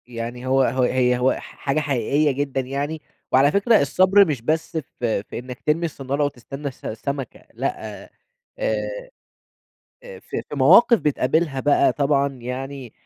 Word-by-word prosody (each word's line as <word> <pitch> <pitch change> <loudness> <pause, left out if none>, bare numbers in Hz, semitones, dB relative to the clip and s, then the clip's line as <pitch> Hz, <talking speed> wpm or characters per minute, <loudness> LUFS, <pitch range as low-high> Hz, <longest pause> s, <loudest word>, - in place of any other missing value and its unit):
يعني 120 +1 -6
هو 135 +1 +3
هو 130 +1 +1
هي 125 0 +2
هو 130 +1 +3
ح - - -6 0.2
حاجة 140 +2 -1
حقيقية 145 +1 +1
جدًا 135 0 -2
يعني، 140 +4 -4 0.3
وعلى 135 +3 +5
فكرة 215 +5 +4
الصبر 185 +8 +5
مش 145 -7 -2
بس 160 +6 -1
في 120 -8 -3
في - - -7
إنّك 125 0 -9
ترمي 160 +3 +1
الصنّارة 140 -2 -2
وتستنى 135 +1 -6
الس 135 - -9
السمكة، 135 +4 -5
لأ، - - -4
آآ، - - -17 0.5
آآ، - - 0 1.4
في - - -5
في - - -6
مواقف 180 - +6
بتقابلها 150 0 0
بقى 145 -1 +3
طبعًا 140 0 +1
يعني 130 -1 -7
140 Hz, 150 wpm, -22 LUFS, 125-150 Hz, 1.4 s, مواقف